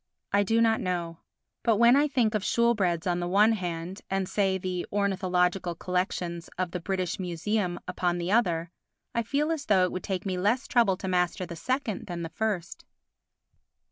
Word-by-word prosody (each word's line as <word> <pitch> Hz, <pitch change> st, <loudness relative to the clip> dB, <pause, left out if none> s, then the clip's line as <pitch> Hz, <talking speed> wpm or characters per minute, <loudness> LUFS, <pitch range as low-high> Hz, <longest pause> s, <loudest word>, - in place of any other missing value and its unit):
I 200 Hz, -, +5 dB
do 225 Hz, +3 st, +2 dB
not 225 Hz, -1 st, +3 dB
know. 170 Hz, -3 st, -3 dB, 0.4 s
But 230 Hz, -, +3 dB
when 235 Hz, +3 st, +6 dB
I 290 Hz, +2 st, +4 dB
think 245 Hz, -6 st, +1 dB
of 215 Hz, -, 0 dB
Shoolbred's 200 Hz, -7 st, +1 dB
on 175 Hz, -1 st, 0 dB
the 175 Hz, -, -2 dB
one 205 Hz, +5 st, +5 dB
hand 180 Hz, -2 st, -4 dB
and, 195 Hz, -1 st, 0 dB
say, 195 Hz, -1 st, +1 dB
the 180 Hz, -1 st, -3 dB
ornithological 185 Hz, -3 st, +1 dB
collections 180 Hz, -1 st, -2 dB
of 185 Hz, -1 st, -1 dB
the 180 Hz, -, -3 dB
British 185 Hz, 0 st, -2 dB
Museum 180 Hz, +1 st, -1 dB
upon 180 Hz, -1 st, 0 dB
the 175 Hz, +2 st, -2 dB
other, 175 Hz, -7 st, +1 dB, 0.4 s
I 235 Hz, -, +1 dB
feel 285 Hz, +7 st, 0 dB
as 310 Hz, -3 st, -3 dB
though 190 Hz, -3 st, +4 dB
it 180 Hz, -, +1 dB
would 185 Hz, -, -4 dB
take 190 Hz, -1 st, -3 dB
me 185 Hz, -2 st, -1 dB
less 220 Hz, +8 st, +1 dB
trouble 225 Hz, -7 st, +3 dB
to 190 Hz, -, -5 dB
master 180 Hz, +1 st, 0 dB
the 170 Hz, -, -7 dB
second 255 Hz, -, -2 dB
than 175 Hz, -1 st, -4 dB
the 165 Hz, -, -4 dB
first. 200 Hz, -4 st, -3 dB
185 Hz, 185 wpm, -28 LUFS, 175-215 Hz, 0.4 s, when